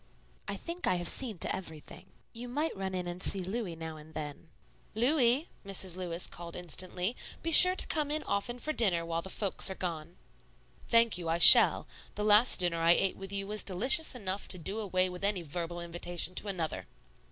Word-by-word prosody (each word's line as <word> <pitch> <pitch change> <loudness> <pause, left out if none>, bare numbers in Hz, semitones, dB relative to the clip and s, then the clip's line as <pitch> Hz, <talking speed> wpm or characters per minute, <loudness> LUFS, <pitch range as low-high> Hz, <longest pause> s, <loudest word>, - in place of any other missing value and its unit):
"I - - -5
think 345 +1 -7
I 185 - +1
have 175 -1 -4
seen 230 -2 -2
to - - -3
everything. 180 0 -12 0.3
You 245 +1 -9
might 300 +6 -3
run 190 -1 -6
in 180 -1 -5
and 175 +1 -8
see 195 - -1
Louis 190 -2 -6
now 160 -1 -9
and 155 +1 -16
then." 150 +1 -8 0.5
"Louis," 250 +3 +1 0.2
Mrs. 190 -3 -1
Lewis 180 -1 -3
called 170 -1 -9
instantly, 180 +4 -3 0.3
"be 330 - -3
sure 365 +3 +8
to - - +4
come 300 -3 -2
in 305 +1 -4
often 220 +5 -4
for 310 +5 -5
dinner 180 - 0
while 165 0 -4
the 190 - -10
folks 200 0 -1
are 190 - -6
gone." 170 -2 -7 0.7
"Thank 230 -4 +2
you; 165 -2 -6
I 165 - -1
shall. - - +9 0.3
The 210 - -4
last 215 +1 +3
dinner 175 -2 -1
I 165 +1 +4
ate 195 +1 +1
with 195 0 -10
you 195 0 -4
was 210 +1 -3
delicious 255 - +3
enough 195 -4 -4
to 185 - 0
do 195 +6 -6
away 185 -3 -1
with 180 +1 -10
any 200 -3 0
verbal 170 +2 -6
invitation 175 +1 -3
to 205 - -3
another." 160 - -5
185 Hz, 200 wpm, -29 LUFS, 170-225 Hz, 0.7 s, shall